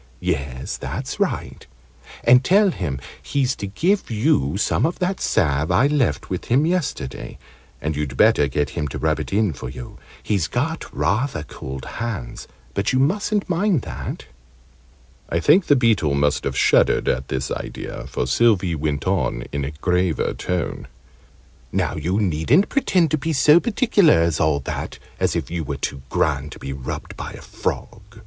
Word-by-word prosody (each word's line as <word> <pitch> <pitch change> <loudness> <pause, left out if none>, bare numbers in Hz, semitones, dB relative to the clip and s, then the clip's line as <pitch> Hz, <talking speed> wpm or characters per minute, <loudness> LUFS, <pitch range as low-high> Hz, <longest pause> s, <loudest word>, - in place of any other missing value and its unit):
"Yes, 70 -7 -3
that's - - -5
right. - - -2 0.6
And 125 +2 +6
tell 195 +6 +4
him 75 - -3 0.2
he's 135 -2 0
to 100 - -4
give 180 - 0
you 105 - +1
some - - +1
of 170 - 0
that 185 +1 -1
salve 75 -6 +1
I 90 +9 +4
left 140 - +1
with - - -4
him 135 +6 +3
yesterday. 130 - -2 0.4
And 75 +1 -2
you'd 70 -3 -3
better 75 - +5
get 70 0 -1
him 75 -3 -2
to 65 - -5
rub - - 0
it - - -5
in 100 -3 +2
for 65 -1 -7
you. 65 -1 -9 0.2
He's 100 -6 0
got 160 +9 -2
rather 110 - 0
cold 65 -2 -8
hands, 110 - -5 0.3
but 100 - 0
you 130 - +1
mustn't 200 +9 +1
mind 180 - +1
that." - - -6 1.0
I 85 - +1
think 165 - +4
the 145 - +6
Beetle 110 - +2
must 70 +1 +1
have - - -2
shuddered - - +3
at 65 +1 0
this 65 0 -3
idea, - - -5
for - - -2
Sylvie 95 - +3
went 75 -3 -2
on 70 -11 0
in 70 -1 -2
a 70 - -2
graver 90 +3 0
tone. 90 -2 -3 0.8
"Now - - 0
you 90 +7 -1
needn't 105 - +2
pretend 185 - +2
to 155 - +1
be 160 +3 -1
so 150 +3 +6
particular 215 - +3
as 85 -2 +1
all 75 -2 +2
that, - - -5 0.2
as - - +1
if - - -3
you 85 -1 -2
were - - -4
too 70 - -4
grand 75 -1 0
to - - -11
be 70 - -6
rubbed 65 -2 -6
by - - -6
a - - -10
frog. - - -4
90 Hz, 170 wpm, -22 LUFS, -, 1.0 s, And